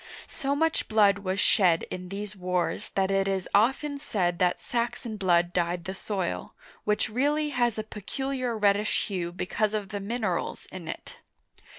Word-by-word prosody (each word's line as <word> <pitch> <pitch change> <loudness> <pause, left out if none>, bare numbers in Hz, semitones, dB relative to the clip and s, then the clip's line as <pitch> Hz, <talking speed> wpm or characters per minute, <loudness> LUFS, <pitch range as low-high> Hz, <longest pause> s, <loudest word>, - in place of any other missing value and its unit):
So 280 -2 -1
much 325 +2 +1
blood 205 -2 +4
was 190 0 -2
shed 175 -6 +4
in 180 0 -5
these 205 +1 -5
wars 180 -2 -1
that 195 0 +2
it 195 0 +2
is 190 -2 -1
often 270 +7 +3
said 180 -11 0
that 180 -1 +2
Saxon 235 -1 -2
blood 175 -3 +2
dyed 175 0 0
the 190 - -3
soil, 190 - -3 0.3
which 210 +2 +2
really 290 +6 +1
has 240 -5 +1
a 215 - -1
peculiar 245 +4 -3
reddish 205 0 +2
hue 175 -3 -2
because 205 +4 -1
of 205 -2 -3
the 205 - -3
minerals 220 +3 -2
in - - -8
it. - - -7
205 Hz, 165 wpm, -28 LUFS, 185-235 Hz, 0.3 s, blood